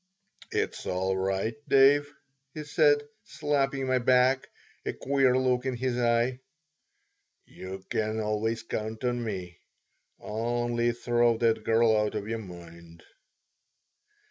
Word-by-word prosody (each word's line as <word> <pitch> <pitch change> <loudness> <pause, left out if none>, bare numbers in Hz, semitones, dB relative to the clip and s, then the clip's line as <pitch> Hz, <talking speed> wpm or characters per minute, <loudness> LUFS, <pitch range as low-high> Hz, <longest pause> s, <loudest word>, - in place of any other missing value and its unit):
"It's - - -3
all 95 +1 0
right, 95 +3 -1 0.2
Dave," 145 +2 +5 0.4
he 155 - -5
said, 145 -1 +3 0.2
slapping 140 -2 -1
my 130 -1 +1
back, 130 +1 +3 0.3
a - - -3
queer 135 -2 +2
look 125 -1 +1
in 130 -2 -2
his 125 0 -1
eye. 120 +1 +1 1.1
"You 95 0 -9
can 110 0 -1
always 110 +1 -1
count 110 0 -5
on 120 -1 -1
me. 90 -5 -6 0.6
Only 120 +2 -1
throw 120 -1 +1
that 115 -1 +1
girl 115 0 +3
out 105 0 0
of 100 - -4
your 115 0 -3
mind." 85 -3 -12
120 Hz, 120 wpm, -28 LUFS, 105-130 Hz, 1.1 s, Dave